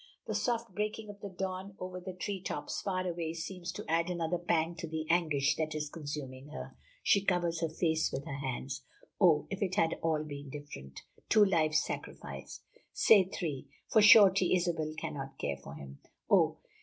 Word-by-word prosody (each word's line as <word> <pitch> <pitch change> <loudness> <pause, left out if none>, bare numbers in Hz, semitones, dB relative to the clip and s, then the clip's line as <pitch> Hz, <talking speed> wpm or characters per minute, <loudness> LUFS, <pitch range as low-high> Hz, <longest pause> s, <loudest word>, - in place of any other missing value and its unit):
The - - -3
soft 235 -4 -1
breaking 210 +1 -3
of 205 - -15
the 200 - -5
dawn 190 +1 -4
over 185 0 -6
the 185 0 -7
tree 195 +1 -4
tops 150 -5 -4
far 185 -2 -1
away 165 -2 -3
seems 175 +2 -5
to - - -6
add 165 +2 +1
another 170 0 -1
pang 170 -1 +1
to 165 - -5
the 160 0 -3
anguish 155 -5 +2
that 155 -1 -1
is 150 -1 -3
consuming 145 -4 -6
her. 150 - -8 0.3
She 200 - +4
covers 175 -3 +1
her 165 - +1
face 160 0 +1
with 135 +2 -4
her 140 -3 -5
hands. 135 0 -4 0.4
Oh! 165 -6 +5
if 195 - -4
it 190 -2 0
had 165 -6 +2
all 160 -2 +1
been 145 -2 -7
different. 100 - -9 0.3
Two 215 -1 +7
lives 155 -5 +3
sacrificed! - - -7 0.5
nay, 200 -4 +9
three! 150 -7 -4 0.2
For 220 - +6
surety 195 -4 +8
Isabel 165 -3 -1
cannot 135 -3 -5
care 70 -1 -2
for 70 +1 -10
him. 70 -1 -10 0.3
Oh! - - +5
165 Hz, 180 wpm, -32 LUFS, 150-185 Hz, 0.5 s, nay